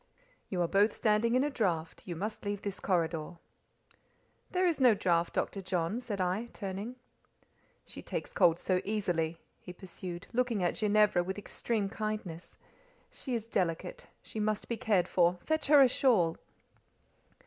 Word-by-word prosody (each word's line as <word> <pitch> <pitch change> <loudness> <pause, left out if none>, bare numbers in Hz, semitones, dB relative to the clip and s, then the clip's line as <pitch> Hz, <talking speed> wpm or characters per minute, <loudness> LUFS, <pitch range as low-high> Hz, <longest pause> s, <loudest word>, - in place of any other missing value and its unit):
"You 180 -2 0
are - - +1
both 200 +5 +3
standing 225 +2 +2
in 255 - +4
a 295 - 0
draught; 170 -10 -2
you 175 - -4
must 210 +6 -4
leave 205 -1 -3
this 200 -1 -4
corridor." 170 -2 -1 1.1
"There 365 0 +1
is 340 -4 +1
no 250 -4 +6
draught, 170 -3 +1
Dr. 195 - -1
John," 180 +3 -1
said 215 -5 -5
I, 185 +6 0
turning. 200 +4 -5 0.9
"She - - -9
takes - - -5
cold 175 -3 +4
so 185 -1 +1
easily," 175 -6 -1 0.2
he 180 - -10
pursued, 180 -1 -8
looking 235 -5 +1
at 175 - +2
Ginevra 210 -4 +3
with 190 +3 -4
extreme 205 0 -2
kindness. 210 -5 -5 0.5
"She 255 -3 -4
is 225 -2 -3
delicate; 190 - -2 0.2
she 220 - -7
must 215 0 -1
be 235 - -1
cared 210 -6 +1
for: 175 0 +3
fetch 315 -1 0
her 290 -1 +8
a - - +7
shawl." 220 -11 +3
200 Hz, 160 wpm, -31 LUFS, 175-225 Hz, 1.1 s, her